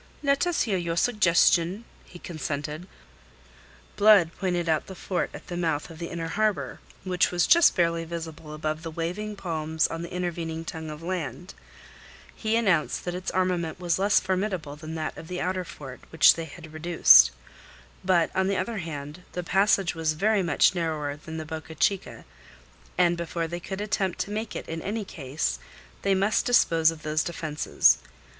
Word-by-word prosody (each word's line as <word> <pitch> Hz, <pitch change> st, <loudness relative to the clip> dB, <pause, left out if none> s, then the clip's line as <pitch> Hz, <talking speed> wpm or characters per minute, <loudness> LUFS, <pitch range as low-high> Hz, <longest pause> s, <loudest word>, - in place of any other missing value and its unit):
"Let 280 Hz, +4 st, +2 dB
us 350 Hz, -, +1 dB
hear 195 Hz, -5 st, 0 dB
your 170 Hz, -1 st, -3 dB
suggestion," 185 Hz, -1 st, +3 dB, 0.2 s
he 175 Hz, -, -13 dB
consented. 155 Hz, 0 st, -5 dB, 1.1 s
Blood 205 Hz, -5 st, +6 dB
pointed 175 Hz, -3 st, -1 dB
out 160 Hz, -1 st, +1 dB
the 190 Hz, -, -8 dB
fort 185 Hz, 0 st, -2 dB
at -, -, -10 dB
the 175 Hz, -, -6 dB
mouth 165 Hz, -2 st, -1 dB
of 160 Hz, -, -12 dB
the 170 Hz, -, -5 dB
inner 165 Hz, -1 st, -4 dB
harbour, 215 Hz, +2 st, -1 dB, 0.2 s
which 180 Hz, -2 st, +1 dB
was 175 Hz, -2 st, +1 dB
just 340 Hz, 0 st, +6 dB
barely 170 Hz, -1 st, +1 dB
visible 160 Hz, -2 st, -7 dB
above 155 Hz, 0 st, -3 dB
the 165 Hz, -, -5 dB
waving 180 Hz, +7 st, -4 dB
palms 160 Hz, -4 st, -1 dB
on 165 Hz, -, -3 dB
the 170 Hz, -, -7 dB
intervening 165 Hz, -2 st, -3 dB
tongue 160 Hz, -1 st, -6 dB
of 150 Hz, +1 st, -8 dB
land. 180 Hz, 0 st, -4 dB, 0.8 s
He 220 Hz, 0 st, -1 dB
announced 195 Hz, -9 st, +1 dB
that 175 Hz, -, -2 dB
its 180 Hz, +1 st, -4 dB
armament 180 Hz, -3 st, -1 dB
was 175 Hz, 0 st, 0 dB
less 200 Hz, +1 st, +4 dB
formidable 185 Hz, -5 st, -2 dB
than 155 Hz, +1 st, -8 dB
that 155 Hz, -1 st, -3 dB
of 160 Hz, -, -10 dB
the 180 Hz, 0 st, -4 dB
outer 185 Hz, 0 st, -1 dB
fort, 135 Hz, -6 st, -10 dB
which 160 Hz, -2 st, +6 dB
they 165 Hz, -, -5 dB
had 160 Hz, 0 st, -12 dB
reduced; 150 Hz, -, +7 dB, 0.7 s
but 175 Hz, -3 st, +2 dB
on 190 Hz, 0 st, +2 dB
the 195 Hz, -1 st, 0 dB
other 215 Hz, +3 st, -2 dB
hand, 150 Hz, -1 st, -7 dB
the 180 Hz, -, -3 dB
passage 195 Hz, 0 st, +2 dB
was 160 Hz, -2 st, 0 dB
very 205 Hz, +5 st, +2 dB
much 170 Hz, 0 st, +3 dB
narrower 155 Hz, -5 st, -2 dB
than 160 Hz, +2 st, -9 dB
the 155 Hz, -, -5 dB
Boca 160 Hz, +1 st, -7 dB
Chica, 195 Hz, +2 st, -1 dB, 0.7 s
and 175 Hz, -1 st, +4 dB
before 170 Hz, -1 st, -3 dB
they 175 Hz, +1 st, -5 dB
could 190 Hz, +3 st, -6 dB
attempt 195 Hz, -3 st, -1 dB
to 205 Hz, -, -4 dB
make 215 Hz, +1 st, -4 dB
it -, -, -6 dB
in 165 Hz, 0 st, -5 dB
any 210 Hz, +3 st, -3 dB
case, 135 Hz, -, -3 dB, 0.4 s
they 195 Hz, -1 st, +2 dB
must 200 Hz, +3 st, +2 dB
dispose 165 Hz, -9 st, +4 dB
of 165 Hz, 0 st, -7 dB
those 155 Hz, 0 st, 0 dB
defences. 155 Hz, -3 st, +2 dB
170 Hz, 175 wpm, -26 LUFS, 160-190 Hz, 1.1 s, reduced